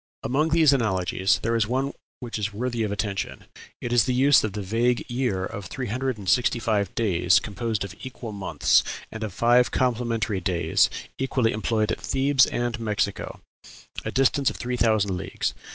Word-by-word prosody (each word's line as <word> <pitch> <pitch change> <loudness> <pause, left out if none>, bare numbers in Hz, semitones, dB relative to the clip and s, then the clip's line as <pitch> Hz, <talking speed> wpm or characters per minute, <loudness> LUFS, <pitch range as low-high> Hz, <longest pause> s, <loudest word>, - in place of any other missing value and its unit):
Among 150 +5 +1
these 160 -3 +5
analogies 95 -6 +1
there 115 +1 +1
is 110 -2 +1
one 135 +4 -1 0.3
which 120 -3 -5
is 105 +1 -2
worthy 120 +2 -3
of 105 -2 -1
attention 100 -1 -3 0.4
it 120 - -3
is 120 -4 +4
the 125 - 0
use 135 +1 +5
of 110 -3 -2
the 105 - -4
vague 115 +5 0
year 120 -7 -1
of 100 0 -7
three 130 - -5
hundred 130 -1 -2
and 100 -2 -10
sixty 125 +3 +3
five 105 -4 -1
days, 90 -6 +3
composed 110 0 -3
of 100 -1 -7
equal 125 -3 -7
months, 95 -7 +2 0.3
and 110 0 -6
of 110 - -3
five 120 +5 +3
complementary 115 -5 0
days, 85 -3 +2 0.3
equally 130 -3 +1
employed 110 0 0
at - - -3
Thebes 135 0 +3
and 120 -1 -2
Mexico 105 -2 -2 0.6
a - - -3
distance 135 +1 +2
of - - -7
three 125 +1 -3
thousand 110 -5 +2
leagues.... 95 +1 -3
115 Hz, 180 wpm, -25 LUFS, 100-125 Hz, 0.6 s, these